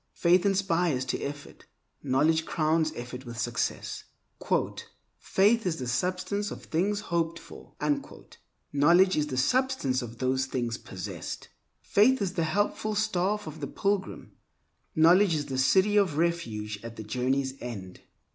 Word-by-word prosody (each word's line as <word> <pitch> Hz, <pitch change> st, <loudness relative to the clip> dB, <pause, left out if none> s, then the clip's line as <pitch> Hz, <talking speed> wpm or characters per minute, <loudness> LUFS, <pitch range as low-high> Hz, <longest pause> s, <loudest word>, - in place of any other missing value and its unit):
Faith 180 Hz, +3 st, +4 dB
inspires 175 Hz, -8 st, +1 dB
to 125 Hz, -, -2 dB
effort; 145 Hz, 0 st, -7 dB, 0.3 s
knowledge 160 Hz, +5 st, +2 dB
crowns 160 Hz, -1 st, +1 dB
effort 125 Hz, +1 st, -7 dB
with 120 Hz, -2 st, -8 dB
success. 120 Hz, -1 st, -2 dB, 1.1 s
"Faith 210 Hz, +2 st, +2 dB
is 165 Hz, -2 st, -1 dB
the 130 Hz, -, -4 dB
substance 185 Hz, +10 st, -1 dB
of -, -, -8 dB
things 200 Hz, +6 st, 0 dB
hoped 165 Hz, 0 st, 0 dB
for"; -, -, -13 dB, 1.0 s
knowledge 175 Hz, +7 st, +5 dB
is 150 Hz, -1 st, +1 dB
the 130 Hz, -3 st, -4 dB
substance 250 Hz, -, +1 dB
of 120 Hz, -1 st, -8 dB
those 130 Hz, +1 st, 0 dB
things 120 Hz, -3 st, -2 dB
possessed. 95 Hz, -1 st, -7 dB, 0.3 s
Faith 250 Hz, +6 st, +4 dB
is 195 Hz, -3 st, -1 dB
the 170 Hz, -4 st, 0 dB
helpful 205 Hz, +5 st, 0 dB
staff 210 Hz, -1 st, 0 dB
of 155 Hz, 0 st, -8 dB
the 140 Hz, -, -4 dB
pilgrim; 200 Hz, +1 st, -2 dB, 0.6 s
knowledge 170 Hz, +3 st, +5 dB
is 150 Hz, -1 st, -2 dB
the 135 Hz, -2 st, -3 dB
City 190 Hz, +11 st, +4 dB
of 185 Hz, -8 st, +2 dB
Refuge 115 Hz, -12 st, -1 dB
at 115 Hz, 0 st, -8 dB
the 110 Hz, -, -7 dB
journey's 130 Hz, +4 st, -1 dB
end. 100 Hz, -7 st, -7 dB
160 Hz, 140 wpm, -28 LUFS, 130-190 Hz, 1.1 s, knowledge